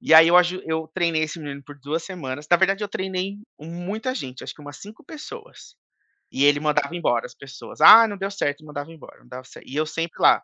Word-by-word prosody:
E 160 - +3
aí, 160 +1 +9
eu 175 - +5
aju 180 +1 +1
eu 160 0 -3
treinei 170 -3 0
esse 155 - -7
menino 140 -2 -8
por 145 +1 -14
2 150 +4 -4
semanas 150 -6 -7
na 175 - +7
verdade 195 +2 +1
eu 205 - -3
treinei 190 0 -4 0.2
muita 185 - -5
gente, 130 - -7
acho - - -8
que - - -18
umas 145 0 -11
5 210 +4 -13
pessoas. 305 0 -12 0.6
E 135 - +1
ele 145 0 +4
mandava 150 +1 -1
embora 120 -9 0
as 125 - -11
pessoas: 135 -1 -12
"Ah, 230 +1 +10
não 205 -2 -6
deu 195 +1 -3
certo" 150 -6 -3
e - - -16
mandava 150 +1 -8
embora, 160 -3 -15
não - - -24
dava 125 +1 -9
cer - - -15
e 135 - -10
eu 155 +1 0
sempre 165 +1 -5
lá. - - +5
160 Hz, 240 wpm, -23 LUFS, 145-185 Hz, 0.6 s, Ah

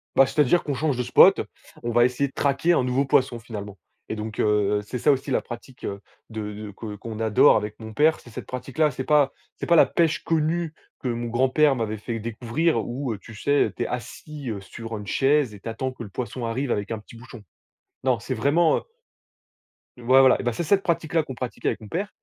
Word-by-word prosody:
Bah 135 - +7
c'est-à-dire 150 +4 +2
qu'on 145 - -2
change 145 +1 0
de 125 - 0
spot, - - +6 0.4
on 120 - -2
va 120 +1 +5
essayer 125 +3 0
de - - -23
traquer 140 +4 +1
un 135 - +2
nouveau 130 +2 +1
poisson 130 -3 +2
finalement 105 -3 -8 0.3
et - - -3
donc, 110 0 -6
heu, 105 -1 +2
c'est 125 +4 -5
ça 145 - +4
aussi 135 0 -1
la - - +2
pratique, 125 +2 -10
heu, 100 0 -4 0.3
de 110 -2 -5
de 105 0 -7
que 105 -2 -6
qu'on 110 +1 -7
adore 110 -2 +5
avec 105 0 -5
mon 110 -1 -8
père, 155 +8 +3
c'est - - -15
cette 115 - -8
pratique-là, 135 +4 -1
c'est 130 0 -5
pas 145 -1 +3 0.2
c'est - - -4
pas 170 - +4
la - - +7
pêche 160 -2 +1
connue 165 0 0 0.2
que - - -4
mon 120 -1 -2
grand-père 130 +5 +3
m'avait 110 -3 -2
fait 115 +2 -4
découvrir 115 +8 -1
où, 125 0 -3
heu, - - -6
tu 110 +3 -13
sais, 145 +6 +1
t'es 120 - -2
assis, 130 +2 -6
heu, 100 -2 -5
sur 115 +3 -8
une 105 -1 -8
chaise 135 0 +2
et - - -12
t'attends 115 +5 -4
que 130 -2 -9
le 105 - -9
poisson 115 +3 -5
arrive 125 +3 -2
avec 105 +1 -2
un 110 - -2
petit 110 - -15
bouchon. 120 0 -12 0.6
Non, 130 -2 +2
c'est 130 - -4
vraiment, 145 +8 +3
heu - - -3 1.2
Ouais 130 +2 +4
voilà, 135 -1 +6
et - - -8
beh 120 - +1
c'est 170 - -3
cette 195 +3 +3
pratique 170 -1 -1
là 160 - +3
qu'on 135 -3 -8
pratique 125 0 -6
avec - - 0
mon 110 - -11
père. 190 - -3
125 Hz, 230 wpm, -24 LUFS, 110-145 Hz, 1.2 s, Bah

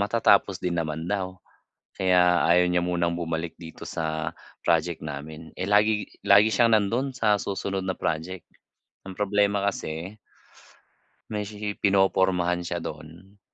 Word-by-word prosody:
matatapos 100 -2 +3
din 90 - -1
naman 80 0 -3
daw, 95 -2 -2 0.6
kaya 90 -2 +4
ayaw 90 +1 +5
niya 90 0 +2
munang 85 -1 0
bumalik 80 -1 -3
dito 80 -1 -10
sa 80 -1 -3 0.3
project 85 0 +1
namin. 75 +2 -7
Eh, 95 - -1
lagi 105 +1 +3 0.2
lagi 100 +2 +6
siyang 115 +2 +4
nando'n 120 +7 -1
sa 105 -5 +2
susunod 95 -1 -3
na 95 - -1
project. 85 +3 -3 0.6
Ang 95 - -7
problema 100 0 +1
kasi 90 +3 -4 1.1
may 105 -1 -3
sishi 105 0 -5
pinopormahan 95 -3 +2
siya 85 -1 -3
do'n. 85 +6 -10
95 Hz, 135 wpm, -25 LUFS, 85-100 Hz, 1.1 s, lagi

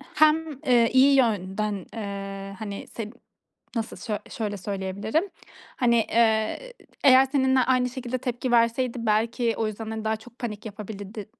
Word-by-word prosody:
hem, 310 -2 +3
eee, 240 -3 +5
iyi 270 +2 +6
yönden, 205 -4 0
eee, 195 -2 -6
hani 205 -2 -6
seni 220 -2 -6 0.6
nasıl 225 -1 -3
söy 215 -3 -3
şöyle 210 -2 -3
söyleyebilirim, 200 - -2 0.5
hani, 240 -2 +3 0.2
eee, 225 - +1 0.3
eğer 265 -1 +8
seninle 265 -2 +3
aynı 255 0 +2
şekilde 255 -1 -4
tepki 245 0 -3
verseydi 235 +1 +2
belki 230 +2 +1
o 225 - 0
yüzden, 220 +1 -5
hani, 220 0 -5
daha 220 0 +1
çok 235 +2 -17
panik 215 -3 -5
yapabilirdi 210 0 -7
225 Hz, 140 wpm, -25 LUFS, 210-255 Hz, 0.6 s, eğer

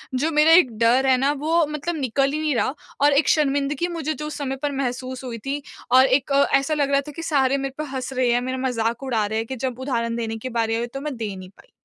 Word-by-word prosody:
जो 310 +6 0
मेरा 305 +2 +5
एक 325 -8 +6
डर 245 +4 +4
है 260 - +5
ना 275 +3 +2
वो 325 +2 +2
मतलब 300 +3 -3
निकल 275 0 0
ही 305 - -1
नहीं 305 -4 0
रहा 260 - 0 0.3
और 290 0 +5
एक 280 +2 +3
शर्मिंदगी 285 +2 +1
मुझे 320 -3 -3
जो 300 0 -6
उस 305 - -6
समय 270 -2 -3
पर 290 - 0
महसूस 260 -1 -4
हुई 240 -2 -5
थी 285 +1 -2 0.3
और 260 +1 +7
एक 270 +1 +1 0.2
ऐसा 275 +3 +2
लग 285 -2 0
रहा 275 0 +3
था 295 - -6
कि 330 - -6
सारे 275 -4 +2
मेरे 270 -1 -4
पर 305 - -3
हँस 260 0 -4
रहे 255 -2 +1
हैं, 245 - +2
मेरा 255 +1 -3
मज़ाक 235 +1 -1
उड़ा 230 -5 0
रहे 220 +2 -2
हैं 225 - -2
कि 265 - -4
जब 255 0 -4
उदाहरण 235 -3 -2
देने 225 -1 -3
के 255 +3 -6
बारी 225 0 +1
आई 235 +1 -2
तो 275 - -5
मैं 295 -3 -4
दे 210 -3 -4
नहीं 185 -1 -10
पाई। - - -22
270 Hz, 270 wpm, -23 LUFS, 245-290 Hz, 0.3 s, और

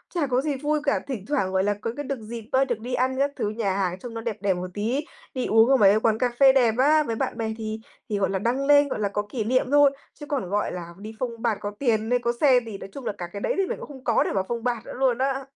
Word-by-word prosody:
chả 305 -5 +1
có 255 0 +1
gì 290 -1 -1
vui 300 +3 0
cả. 285 - +1
Thỉnh 240 -8 -5
thoảng, 265 -11 0
gọi 190 0 +1
là, 205 +1 +2
có 230 - -2
cái 290 - -3
được 275 -2 -4
dịp 225 0 -8
á, 265 +1 +3
được 240 -4 -2
đi 245 +3 -6
ăn 260 +1 +1
các 280 +1 +2
thứ 210 - -1
nhà 215 -3 -1
hàng 185 -1 -1
trông 240 +1 -8
nó 225 - -5
đẹp 225 -3 -3
đẹp 200 -2 +2
một 180 +1 -4
tí, 240 +9 -1 0.3
đi 255 -3 -2
uống 225 +2 +5
ở 270 - +5
mấy 205 0 +5
quán 220 -1 +2
cà 250 +1 +1
phê 270 -1 +7
đẹp 240 -4 +4
á, 300 +3 +4
với 230 -4 -3
bạn 225 - -2
bè 220 -1 -2
thì 220 -1 -4 0.3
thì, 210 - 0
gọi 195 - +1
là, 195 - -1
đăng 250 +7 0
lên, 290 0 +6
gọi 215 - -4
là, 200 -1 0
có 205 - -1
kỷ 225 -1 -2
niệm 255 +3 +1
thôi. 290 -1 +6 0.2
Chứ 295 - -10
còn, 265 -11 -3
gọi 205 +1 0
là, 170 -1 -7
đi 215 +3 -8
phông 235 -3 -4
bạt 230 -3 +1
có 205 - -3
tiền, 225 -4 +1
có 235 0 0
xe 265 -4 +6
thì 210 -3 -6
nói - - -9
chung 275 -4 -8
là - - -1
cả 175 - -4
cái 200 - -5
đấy - - 0
thì 390 - +2
mình - - -4
cũng - - -8
không 270 -3 -12
có 235 -3 +3
để - - -2
mà 190 -1 +1
phông 235 +1 -3
bạt 240 -2 -2
nữa - - -8
luôn 255 -2 +1
á. 270 +1 -1
235 Hz, 310 wpm, -25 LUFS, 210-270 Hz, 0.3 s, phê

